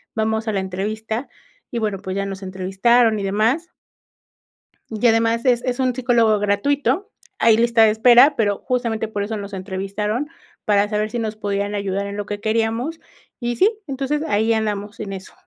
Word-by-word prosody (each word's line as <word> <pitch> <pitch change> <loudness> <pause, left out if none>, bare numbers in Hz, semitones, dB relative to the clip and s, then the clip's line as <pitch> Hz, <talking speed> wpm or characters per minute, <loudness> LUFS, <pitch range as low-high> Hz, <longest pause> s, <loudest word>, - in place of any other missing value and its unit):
vamos 220 0 -1
a - - -1
la 195 - 0
entrevista", 215 +6 -4 0.4
y 235 - -2
bueno, 210 -3 -1
pues 190 0 -5
ya 200 - -1
nos 195 0 -7
entrevistaron 195 +5 +2
y 200 - -4
demás. 225 - 0 1.2
Y 220 +1 -3
además 230 +1 +2
es 245 -2 +3
es 250 0 -2
un 255 -2 +1
psicólogo 235 -4 +3
gratuito, 270 - 0 0.3
hay 225 -1 +5
lista 235 -1 +4
de 220 - +6
espera, 245 +6 +6
pero 205 -3 0
justamente 230 -3 -1
por 205 -2 -3
eso 220 +2 -3
nos 200 -1 -7
entrevistaron 200 +6 -3 0.4
para 205 -1 +2
saber 215 0 -1
si 240 - -4
nos 220 -1 -3
podían 205 -1 -2
ayudar 200 0 -2
en 200 0 -6
lo 205 - -3
que 205 0 -4
queríamos, 225 +8 -1 0.4
y 240 -1 -2
sí, 395 - +4 0.2
entonces 275 +2 -2
ahí 220 +2 +2
andamos 210 -2 -3
en 200 -2 -5
eso. 190 0 -9
220 Hz, 180 wpm, -21 LUFS, 205-240 Hz, 1.2 s, de